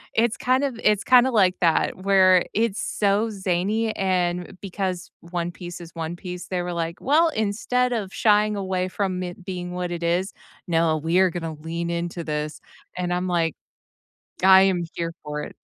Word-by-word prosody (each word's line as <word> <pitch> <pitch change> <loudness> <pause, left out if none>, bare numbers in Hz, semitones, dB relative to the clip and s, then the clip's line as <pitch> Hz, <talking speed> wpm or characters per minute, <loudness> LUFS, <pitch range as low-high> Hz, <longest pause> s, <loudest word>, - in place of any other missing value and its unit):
It's 230 0 +2
kind 255 +2 +1
of 255 -5 -2
it's 210 -2 +3
kinda 255 0 +6
like 190 -5 +3
that 165 +1 +2
where 185 -1 +5
it's 225 -2 0
so 205 +2 +1
zany 200 +3 -1
and 180 -1 -1
because 185 -2 -4
One 170 0 -4
Piece 175 0 -8
is 165 -1 -10
One 165 0 -4
Piece, 180 0 -7
they 180 -1 -2
were, 175 0 -4
like, 170 0 -3
"Well, 320 +5 +3
instead 245 +2 0
of 200 -4 -3
shying 210 -1 +3
away 185 -2 -1
from 185 -1 -2
it 175 +1 -8
being 180 -2 -5
what 180 -1 -3
it 170 -1 -4
is, 175 +3 0 0.3
no, 165 -2 +2
we 165 +4 +1
are 190 -1 +5
gonna 165 -2 -4
lean 165 +2 -5
into 170 0 -3
this," 150 0 -3 0.4
and 180 -1 -1
I'm, 180 +1 -1
like, 165 -3 0 0.9
"I 190 0 +8
am 185 -3 +2
here 165 0 -3
for 150 0 -4
it." - - -9
180 Hz, 180 wpm, -24 LUFS, 170-200 Hz, 0.9 s, I